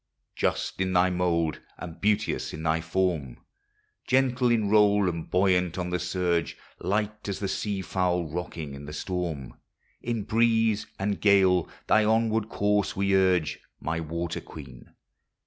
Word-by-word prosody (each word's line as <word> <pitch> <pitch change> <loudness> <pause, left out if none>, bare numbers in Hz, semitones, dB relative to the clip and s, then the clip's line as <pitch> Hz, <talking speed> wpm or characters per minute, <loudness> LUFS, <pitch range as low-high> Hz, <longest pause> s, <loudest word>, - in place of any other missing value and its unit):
Just - - -1
in 95 0 0
thy 90 +1 +4
mould 85 -3 0 0.2
and 85 -1 -9
beauteous 105 +1 0
in 80 - -7
thy 80 0 +1
form, 85 -6 -1 0.7
Gentle 130 -1 +2
in 115 -3 +2
roll 105 -1 +4
and 85 -2 -3
buoyant 90 -2 +2
on 90 -1 -3
the 90 - 0
surge, 85 -2 -1 0.2
Light 105 +3 -2
as 100 - -2
the 100 - -3
sea 100 0 -2
fowl 90 -2 0
rocking 80 -2 -5
in 70 +1 -9
the 75 - -8
storm, 80 -5 -4 0.4
In 115 -3 -2
breeze 115 -1 +2
and 100 +1 -2
gale 95 -4 +4 0.2
thy 110 - +4
onward 110 0 +1
course 105 -2 0
we 100 0 +1
urge, 90 -4 +2 0.2
My 80 +2 -2
water 85 +1 -4
queen - - -12
95 Hz, 145 wpm, -27 LUFS, 85-105 Hz, 0.7 s, thy